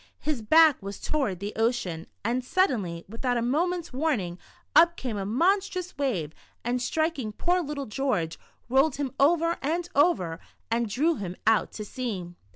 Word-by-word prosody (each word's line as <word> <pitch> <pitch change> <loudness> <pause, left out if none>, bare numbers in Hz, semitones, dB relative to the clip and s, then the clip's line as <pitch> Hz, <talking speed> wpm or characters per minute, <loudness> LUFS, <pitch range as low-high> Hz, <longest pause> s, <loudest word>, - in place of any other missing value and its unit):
His 295 -6 -2
back 310 +5 +6
was 200 0 -6
toward 240 - -1
the 205 +2 -4
ocean, 225 -8 -1 0.2
and 245 +3 0
suddenly, 230 - 0
without 245 +4 -1
a - - 0
moment's 335 +5 0
warning, 240 - -1 0.4
up 340 +1 +6
came 245 -5 -3
a 195 -1 -3
monstrous 365 - +1
wave, 200 - -1 0.3
and 245 +1 -1
striking 315 -4 -1
poor 355 +11 +1
little 290 -3 -4
George, 210 -9 -1 0.3
rolled 270 +4 +3
him 280 -2 -2
over 335 +3 +3
and 335 +5 -1
over, 225 - +2 0.3
and 230 -1 +1
drew 300 +10 +1
him 185 -3 -4
The - - -19
Shadow. 225 - +8
91 - - +5
out - - -11
to 210 - -6
sea. 215 -6 -4
255 Hz, 170 wpm, -27 LUFS, 210-315 Hz, 0.4 s, Shadow